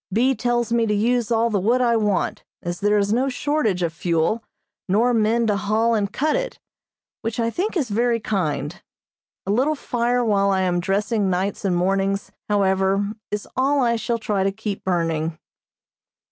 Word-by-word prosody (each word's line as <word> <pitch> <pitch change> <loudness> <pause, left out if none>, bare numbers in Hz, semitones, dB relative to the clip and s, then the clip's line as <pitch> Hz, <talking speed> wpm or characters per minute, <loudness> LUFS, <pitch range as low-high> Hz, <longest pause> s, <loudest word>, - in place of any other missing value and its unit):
B. 250 +7 +3
tells 240 -2 0
me 230 -1 +2
to 210 - +1
use 235 +2 +1
all 230 0 +2
the 205 - +1
wood 230 +7 +2
I 240 -2 +3
want, 210 -3 0 0.2
as 175 0 -4
there 210 +1 +2
is 205 +1 +1
no 260 +4 +1
shortage 250 -9 0
of 165 -2 -1
fuel, 170 +6 0 0.5
nor 230 +6 +3
men 230 +1 +2
to 210 -2 +2
haul 215 +4 +1
and 205 -3 0
cut 305 +8 0
it, - - -3 0.6
which 225 +1 -3
I 230 0 +1
think 380 - -2
is 275 -8 -1
very 235 +2 +1
kind. 175 -6 -2 0.6
A 195 - -1
little 265 +8 +2
fire 245 -2 0
while 200 -2 +2
I 190 -1 +2
am 180 -1 +1
dressing 200 +2 0
nights 190 +2 -1
and 185 -2 +2
mornings, 195 +2 0 0.2
however, 195 0 +2 0.2
is 210 0 -4
all 275 +2 +2
I 235 -1 +2
shall 230 +1 -1
try 210 -3 -1
to 195 - +1
keep 205 0 -5
burning. 165 -3 -1
210 Hz, 180 wpm, -22 LUFS, 195-235 Hz, 0.6 s, B